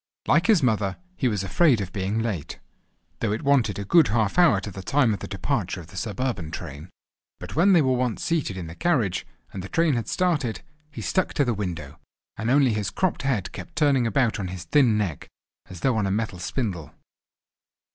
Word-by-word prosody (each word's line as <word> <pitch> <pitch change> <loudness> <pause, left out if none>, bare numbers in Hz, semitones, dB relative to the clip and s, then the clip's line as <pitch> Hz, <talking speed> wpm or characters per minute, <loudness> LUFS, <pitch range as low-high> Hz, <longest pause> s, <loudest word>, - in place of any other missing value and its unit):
Like 170 +6 +3
his 210 -10 +4
mother, 105 -6 +1 0.2
he 135 - 0
was 105 -5 -1
afraid 135 - +3
of 95 -3 -5
being 100 +2 -1
late, 110 -10 -3 0.6
though - - 0
it 110 - -2
wanted 140 -7 +2
a 100 - -4
good 165 - +5
half 110 - +1
hour 165 - +5
to 100 +1 -7
the 95 - -8
time 130 +1 +2
of 100 - -4
the - - -6
departure - - -2
of 85 -1 -11
the - - -14
suburban 105 -3 -3
train. 80 -1 -8 0.5
But - - -8
when 185 +6 +5
they 165 -4 +5
were 130 -1 +2
once 125 -2 -1
seated 155 - -1
in 90 - -5
the 80 - -8
carriage, 125 - 0 0.3
and 95 - -5
the 95 - -8
train 165 -2 +2
had 115 -4 -2
started, 155 -11 0 0.3
he 150 - -8
stuck 185 - 0
to 145 - +3
the 120 - +1
window, 85 -8 -5 0.4
and 110 +2 -3
only 135 -2 +4
his 105 -2 -1
cropped 185 -2 -1
head 130 -9 -1
kept 170 - -9
turning 140 -6 +3
about 120 -2 +1
on 95 - -3
his 90 -1 -6
thin 115 - +3
neck, 95 -9 -3 0.4
as 90 -2 -10
though 130 -3 +2
on 105 -3 +1
a - - -1
metal 100 -3 -2
spindle. 90 - -4
110 Hz, 210 wpm, -25 LUFS, 95-140 Hz, 0.6 s, good